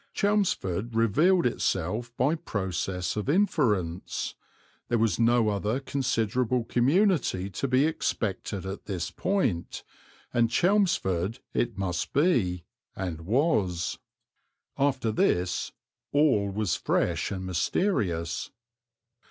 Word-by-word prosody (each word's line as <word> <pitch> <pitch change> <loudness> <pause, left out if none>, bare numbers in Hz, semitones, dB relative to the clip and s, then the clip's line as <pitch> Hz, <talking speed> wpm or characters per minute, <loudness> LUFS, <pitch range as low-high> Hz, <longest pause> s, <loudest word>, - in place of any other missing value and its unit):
Chelmsford 120 - 0
revealed 155 - +3
itself 110 0 -1
by 135 +5 +3
process 95 - -3
of 105 +4 -3
inference; 115 - 0 0.5
there 120 - +1
was 115 0 +1
no 115 -1 +4
other 105 +4 -1
considerable 125 -2 0
community 130 - +2
to 140 - -2
be 130 +2 +3
expected 100 - -2
at 95 +1 -6
this 90 -4 -3
point, 125 - -1 0.5
and 120 -1 +3
Chelmsford 120 - +1 0.2
it 120 -5 -1
must 90 -3 -2
be, 120 - +2 0.3
and 85 -3 -5
was. 105 - +1 0.8
After 135 -5 +1
this 90 -4 +1 0.4
all 140 -9 +3
was 100 -3 -1
fresh 85 -1 0
and 95 -2 -4
mysterious. 90 - -1
110 Hz, 105 wpm, -27 LUFS, 95-140 Hz, 0.8 s, no